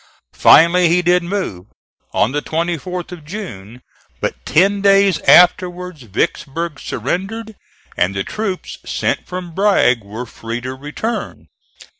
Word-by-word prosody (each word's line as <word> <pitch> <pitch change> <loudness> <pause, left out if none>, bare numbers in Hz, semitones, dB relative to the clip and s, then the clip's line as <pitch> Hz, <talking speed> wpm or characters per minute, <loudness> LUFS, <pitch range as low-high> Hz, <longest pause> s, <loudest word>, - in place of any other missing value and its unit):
Finally 170 +2 +6
he 180 +2 +2
did 180 +1 +3
move, 170 - -4 0.4
on 110 - +1
the 145 +1 -1
24th 175 +3 -3
of 175 -4 -9
June, 125 - -8 0.4
but - - -4
ten 195 +5 +3
days 195 -2 +4
afterwards 180 -2 +4
Vicksburg 145 - -3
surrendered, 195 - -4 0.4
and 95 +2 0
the 95 - -1
troops 200 - -5
sent - - -2
from 180 -1 -6
Bragg 190 - +3
were 110 +5 -7
free 115 0 -6
to 130 +1 -5
return. 150 - -5
170 Hz, 125 wpm, -18 LUFS, 130-185 Hz, 0.4 s, Finally